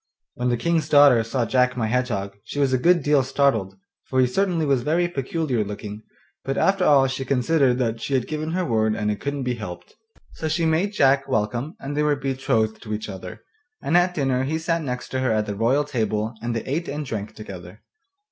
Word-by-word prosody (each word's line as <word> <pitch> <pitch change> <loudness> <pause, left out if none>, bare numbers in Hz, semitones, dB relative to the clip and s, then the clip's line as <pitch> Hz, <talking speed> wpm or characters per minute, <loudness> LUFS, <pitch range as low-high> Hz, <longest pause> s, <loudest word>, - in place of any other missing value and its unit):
When 125 0 -1
the 120 - +1
King's 160 +3 0
daughter 145 -6 +6
saw 120 +2 -1
Jack 125 +1 +2
my 115 - 0
Hedgehog, 110 -4 -1
she 130 - -8
was 135 -2 +2
a 130 - +2
good 170 +2 +3
deal 145 -1 +4
startled, 130 -7 +1 0.3
for 130 - -1
he 130 - +6
certainly 170 +4 0
was 135 -3 +2
very 165 +6 +1
peculiar 140 -5 -1
looking; 105 +1 -7 0.4
but 135 0 -2
after 195 -1 +2
all 140 -5 +5
she 135 0 -2
considered 130 0 +2
that 115 -3 -1
she 140 - -1
had 130 - 0
given 155 +1 -3
her 185 0 0
word 110 -2 +1
and 105 0 -1
it 105 - -4
couldn't 140 -1 -3
be 125 -1 -1
helped. 100 -7 -8 0.4
So 160 - -4
she 160 +2 0
made 165 +6 +1
Jack 135 -5 +3
welcome 120 - -1
and 140 +1 -5
they 150 - +1
were 150 -1 +2
betrothed 130 -5 -1
to 110 -2 -4
each 105 0 -6
other, 95 -2 -8 0.4
and 165 - -1
at 180 0 +3
dinner 135 -3 +1
he 150 +4 -1
sat 165 +1 -1
next 125 -4 -5
her 130 -2 +1
at 110 -1 +1
the 105 - -3
royal 120 +8 +2
table, 110 -5 -2
and 120 0 -2
they 115 - -2
ate 160 +6 -3
and 150 +1 -4
drank 110 -3 -5
together. 95 -2 -10
130 Hz, 215 wpm, -23 LUFS, 110-150 Hz, 0.4 s, daughter